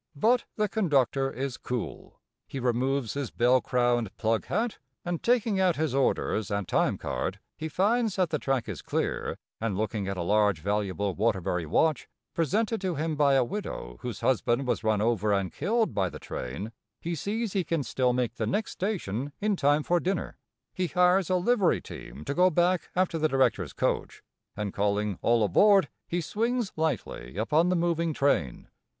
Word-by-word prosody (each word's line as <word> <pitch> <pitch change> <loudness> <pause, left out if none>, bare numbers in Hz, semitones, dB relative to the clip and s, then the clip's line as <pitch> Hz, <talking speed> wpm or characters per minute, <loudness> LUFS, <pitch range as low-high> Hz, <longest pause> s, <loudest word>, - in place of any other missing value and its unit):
But 230 - +3
the 210 -1 +1
conductor 140 - +1
is 135 -1 -4
cool. 125 -2 -5 0.3
He 135 - -5
removes 125 0 0
his 140 -4 -3
bell 125 +2 +3
crowned 120 -4 0
plug 110 0 0
hat, 230 +1 -1 0.3
and, 175 -2 -2
taking 230 -4 +2
out 185 -3 +3
his 155 -3 -1
orders 130 -6 +1
and 100 -3 -2
time - - +1
card, - - -3 0.2
he 160 +1 -5
finds 215 +5 +1
that 185 -4 +1
the 150 - 0
track 135 -4 -1
is - - -5
clear, - - -2 0.2
and, 110 -4 -2
looking 105 -1 -2
at 95 -1 -3
a 85 - -1
large, 105 -1 +3
valuable 100 +1 -1
Waterbury 95 -5 0
watch, 155 - +2 0.3
presented 210 - 0
to 185 -3 -1
him 155 +1 -1
by 140 -2 +4
a 130 - +4
widow 120 - -5
whose 120 -2 -5
husband 130 0 +1
was 125 - -1
run 110 -2 +2
over 110 -2 +1
and 100 -2 0
killed 220 +7 0
by 95 -3 +1
the - - -8
train, 70 - -6 0.3
he 170 - -3
sees 210 +6 -2
he 195 -3 +1
can 165 -2 -1
still 125 +1 +1
make 125 -1 -1
the 110 - -1
next 205 - -1
station 145 - -3
in 210 0 +1
time 145 -2 +2
for 175 +3 +2
dinner. 190 +2 -2 0.4
He 185 -1 -1
hires 180 +1 +3
a 185 - +3
livery 195 +1 +2
team 75 - -10
to - - -2
go 180 +4 +5
back 175 +2 +1
after 180 -2 +1
the 155 0 +2
directors' 135 -1 +1
coach, - - -2 0.3
and, 105 -2 -3
calling 100 -1 0
"All 115 -1 +3
aboard," 195 - +5 0.2
he 175 +1 -1
swings 230 +5 -1
lightly 135 - -3
upon 155 +10 +2
the 180 - +2
moving 170 -2 0
train. 85 - 0
140 Hz, 180 wpm, -28 LUFS, 110-180 Hz, 0.4 s, go